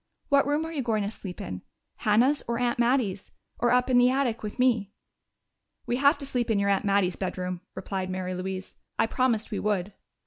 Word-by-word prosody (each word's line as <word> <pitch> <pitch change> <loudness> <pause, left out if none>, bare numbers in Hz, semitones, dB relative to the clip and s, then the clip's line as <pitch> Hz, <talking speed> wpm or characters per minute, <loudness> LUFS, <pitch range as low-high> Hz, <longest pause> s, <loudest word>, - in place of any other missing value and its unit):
What 280 -1 +4
room 295 +2 +1
are 325 - -6
you 300 -4 -2
going 220 -4 0
to 200 - -2
sleep 190 -5 -8
in 90 -1 -5 0.4
Hannah's 245 +7 +3
or 235 0 -1
Aunt 240 0 0
Mattie's 235 -6 +1 0.3
or 240 - +2
up 250 0 +3
in 250 -1 +4
the 245 0 +6
attic 255 -3 0
with 210 -1 -6
me?" 230 -6 +2 0.9
"We 245 - 0
have 280 +3 +4
to 280 - -4
sleep 250 -3 -1
in 220 - +2
your 200 0 +2
aunt 195 +2 +1
Mattie's 195 -3 +2
bedroom," 180 -1 -3
replied 190 -2 -4
Mary 185 0 -3
Louise. 185 +1 -5 0.2
"I - - +3
promised 230 -1 0
we 205 - -2
would." 205 -2 -1
220 Hz, 205 wpm, -27 LUFS, 195-250 Hz, 0.9 s, the